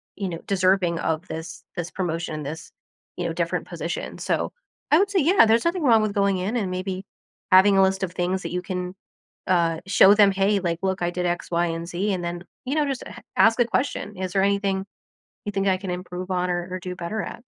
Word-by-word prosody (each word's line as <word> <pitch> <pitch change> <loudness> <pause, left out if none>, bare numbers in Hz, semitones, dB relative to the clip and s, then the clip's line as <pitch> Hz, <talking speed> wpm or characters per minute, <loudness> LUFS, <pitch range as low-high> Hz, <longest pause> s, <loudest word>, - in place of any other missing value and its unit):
you 200 - -3
know, 165 -2 -5
deserving 185 -3 +2
of 160 +2 -1
this 160 +3 -7
this 175 -1 -4
promotion, 165 -4 -3
this, 155 +4 -7 0.5
you - - -2
know, - - -1
different - - -2
position, - - -5
so, - - -1 0.4
I 300 - +7
would 400 0 +2
say, 390 - +3
yeah, 330 - +6
there's 225 +4 +3
nothing 340 0 0
wrong 230 -5 +5
with 215 -1 -1
going 200 -2 +2
in 195 +6 -2
and 195 -5 -1
maybe 185 +1 -3 0.5
having 190 +1 +7
a 195 - +6
list 190 0 +1
of 180 -2 -3
things 185 +1 -1
that - - -4
you 180 - -1
can, 180 0 -4 0.5
uh, 170 -3 +2
show 195 +1 +7
them, 205 -2 +6
"Hey, 195 +1 +2
like, 170 -3 -2
look. 190 -1 0
I 175 - +1
did 180 0 -2
x, 175 +1 -2
y, 170 0 +2
and 165 0 -4
z." 195 +3 -1
And 180 -2 -3
then, 175 +1 -4 0.2
you 260 - -2
know, 305 -1 +2
just 270 -2 -3
a - - -10 0.2
ask 225 +2 +5
a 240 - +5
question. 230 -3 -2
"Is 185 -1 -3
there 195 - +3
anything 200 -1 +1 0.6
you 205 - -2
think 195 0 0
I 185 - +3
can 190 -1 -5
improve 180 +1 -5
on 180 -1 0
or 175 0 -2
or 185 - -3
do 180 0 -6
better 190 +5 -3
at?" - - -7
185 Hz, 230 wpm, -24 LUFS, 175-205 Hz, 0.6 s, I